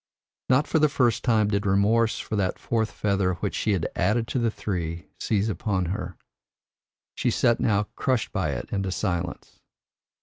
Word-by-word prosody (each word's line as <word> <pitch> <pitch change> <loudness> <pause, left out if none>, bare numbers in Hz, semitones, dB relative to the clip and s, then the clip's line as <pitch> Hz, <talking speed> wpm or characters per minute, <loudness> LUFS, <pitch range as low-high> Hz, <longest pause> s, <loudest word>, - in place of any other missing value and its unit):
Not 130 +3 +4
for 160 - +1
the 155 0 +4
first 120 -5 +1
time 110 -4 +3
did 100 -1 0
remorse 110 +4 +3
for 110 - -4
that 95 -3 0
fourth 110 -2 -1
feather 100 -3 0
which 100 +3 -3
she 105 - 0
had 90 -4 0
added 110 +5 +1
to 130 - 0
the 115 -1 +2
three, 85 -5 -4
seize 105 -1 0
upon 95 -2 -1
her. 90 -4 -5 1.0
She - - 0
sat 115 - +2
now 105 -3 +2
crushed 130 -5 0
by - - -1
it - - -5
into 95 -2 -1
silence. 90 -3 -3
105 Hz, 170 wpm, -25 LUFS, 95-115 Hz, 1.0 s, Not